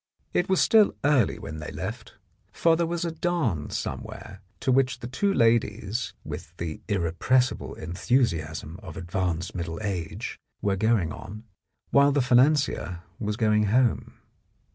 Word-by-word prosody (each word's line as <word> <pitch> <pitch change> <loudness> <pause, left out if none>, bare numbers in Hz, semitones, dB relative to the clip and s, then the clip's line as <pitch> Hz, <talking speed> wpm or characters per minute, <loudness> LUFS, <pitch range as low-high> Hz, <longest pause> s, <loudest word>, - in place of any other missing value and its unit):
It 180 - +1
was 190 - +3
still 220 -2 +5
early 145 -7 +3
when 80 +1 -7
they 75 - -6
left, 100 +9 -6 0.4
for 165 -1 +3
there 170 0 0
was 170 0 -2
a 170 - -1
dance 160 - -1
somewhere 100 0 -6 0.2
to 130 - +1
which 130 0 +3
the 120 - -8
two 130 +12 0
ladies 115 - +1
with 85 +3 -8
the 80 -2 -5
irrepres 100 +7 +2
sible - - -8
enthusiasm 85 - -1
of 95 -4 -9
advanced 90 -1 -2
middle 85 -2 -4
age 90 -6 -4 0.2
were 100 -1 +1
going 105 -5 +2
on, 105 +3 -9 0.5
while 140 +1 +6
the 140 - +2
financier 125 - +2 0.2
was 105 -1 -2
going 105 -2 +3
home. 120 +2 +1
110 Hz, 145 wpm, -26 LUFS, 90-130 Hz, 0.5 s, while